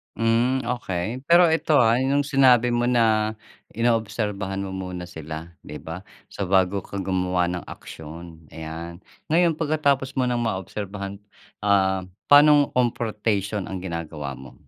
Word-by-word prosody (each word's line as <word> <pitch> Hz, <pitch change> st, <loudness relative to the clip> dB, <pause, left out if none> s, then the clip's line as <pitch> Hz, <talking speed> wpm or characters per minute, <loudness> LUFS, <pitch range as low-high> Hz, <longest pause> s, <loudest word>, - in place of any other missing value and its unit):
Hmm, 115 Hz, +4 st, +2 dB
okey. 120 Hz, +1 st, -3 dB
Pero 170 Hz, +1 st, +6 dB
ito, 160 Hz, -1 st, +1 dB
ah, 115 Hz, 0 st, +4 dB
yung 135 Hz, +2 st, +2 dB
sinabi 130 Hz, -4 st, +4 dB
mo 120 Hz, 0 st, +1 dB
na 110 Hz, -3 st, +2 dB, 0.4 s
inoobserbahan 105 Hz, -4 st, -1 dB
mo 95 Hz, -, -4 dB
muna 90 Hz, -2 st, -6 dB
sila, 80 Hz, +1 st, -7 dB, 0.2 s
'di 75 Hz, -, -8 dB
ba? 90 Hz, +4 st, -8 dB, 0.2 s
So, 100 Hz, -, -4 dB
bago 95 Hz, +1 st, +1 dB
ka 100 Hz, -1 st, -5 dB
gumawa 90 Hz, -1 st, 0 dB
ng 90 Hz, -1 st, -4 dB
aksiyon, 80 Hz, +1 st, -10 dB
ayan. 80 Hz, +3 st, -7 dB, 0.3 s
Ngayon 170 Hz, -2 st, +3 dB
pagkatapos 145 Hz, -4 st, 0 dB
mo 130 Hz, -1 st, 0 dB
ng 120 Hz, -, 0 dB
maobserbahan, 100 Hz, -2 st, -4 dB, 0.5 s
ah, 95 Hz, -2 st, +2 dB, 0.2 s
paanong 145 Hz, 0 st, +7 dB
confrontation 105 Hz, -4 st, -1 dB
ang 95 Hz, -2 st, -6 dB
ginagawa 80 Hz, -6 st, -5 dB
mo? 65 Hz, 0 st, -12 dB
100 Hz, 135 wpm, -24 LUFS, 90-125 Hz, 0.5 s, paanong